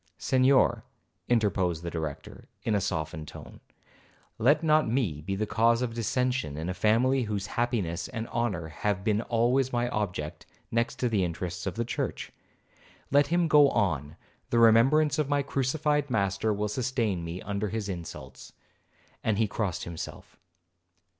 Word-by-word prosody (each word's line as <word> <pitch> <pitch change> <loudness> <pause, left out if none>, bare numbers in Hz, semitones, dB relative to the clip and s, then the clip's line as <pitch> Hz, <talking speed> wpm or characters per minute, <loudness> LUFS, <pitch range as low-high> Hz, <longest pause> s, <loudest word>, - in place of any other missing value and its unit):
'Senhor,' 130 +1 +3 0.5
interposed 95 -8 +1
the 85 - -4
Director, 80 -4 -6 0.2
in 110 - 0
a 100 - +2
softened 80 -4 -3
tone, - - -11 0.8
'let 145 +8 +4
not 155 -4 +3
me 110 - 0
be 95 +5 -3
the 110 +2 -1
cause 115 +3 +2
of 120 -2 -2
dissension 125 - -1
in 80 +3 -3
a - - -1
family 115 +8 +2
whose 105 -2 -3
happiness 105 -8 -1
and 110 +1 -5
honour 100 -9 -2
have 95 +5 -2
been 105 0 +1
always 120 +3 +1
my 120 0 0
object, 90 -9 -4 0.2
next 115 +1 0
to 125 - 0
the 105 -5 +1
interests 90 +1 -4
of - - -3
the 115 +1 -1
church. 115 - -3 0.8
Let 145 +1 +5
him 175 +2 +2
go 145 -2 +6
on, 75 - -1 0.3
the 120 - +1
remembrance 135 +7 +5
of 150 -2 0
my 145 -1 +2
crucified 145 +2 0
Master 100 -1 0
will 105 0 -1
sustain 115 -5 -1
me 85 +2 -5
under 100 +1 -3
his 110 -1 -3
insults,' 85 -4 -8 0.7
and 110 -3 +1
he 110 0 +2
crossed 100 -4 -2
himself. 85 -2 -8
110 Hz, 155 wpm, -28 LUFS, 95-125 Hz, 0.8 s, go